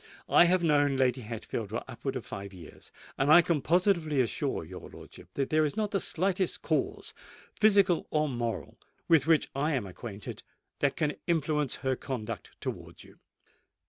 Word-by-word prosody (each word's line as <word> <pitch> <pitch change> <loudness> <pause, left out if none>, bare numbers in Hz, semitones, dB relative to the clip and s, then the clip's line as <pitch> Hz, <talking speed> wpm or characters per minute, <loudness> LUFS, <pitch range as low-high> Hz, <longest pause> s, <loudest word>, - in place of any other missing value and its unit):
I - - +7
have 180 0 +3
known 145 -3 +3
Lady 130 -1 +2
Hatfield 110 -1 -5
for 110 +3 -3
upwards - - -4
of - - -7
five 100 0 -7
years; 85 -4 -13 0.3
and 140 +2 +3
I 175 +2 +9
can 165 -5 0
positively 170 -3 +2
assure 120 -3 -1
your - - -10
lordship - - -13
that 135 -1 -1
there 155 0 +4
is 150 +4 -2
not 210 -2 0
the 195 - +1
slightest 185 +1 0
cause, - - -1 0.4
physical 200 -5 +3
or 155 0 +1
moral, 115 - -4 0.3
with 160 -3 +4
which 165 -2 +3
I 150 +3 0
am 125 -7 -1
acquainted, 100 +2 -7 0.4
that 140 -1 +1
can 150 -2 -1
influence 150 -4 +1
her 130 0 +2
conduct 115 -4 -5
towards - - -6
you." - - -18
145 Hz, 170 wpm, -29 LUFS, 120-170 Hz, 0.4 s, I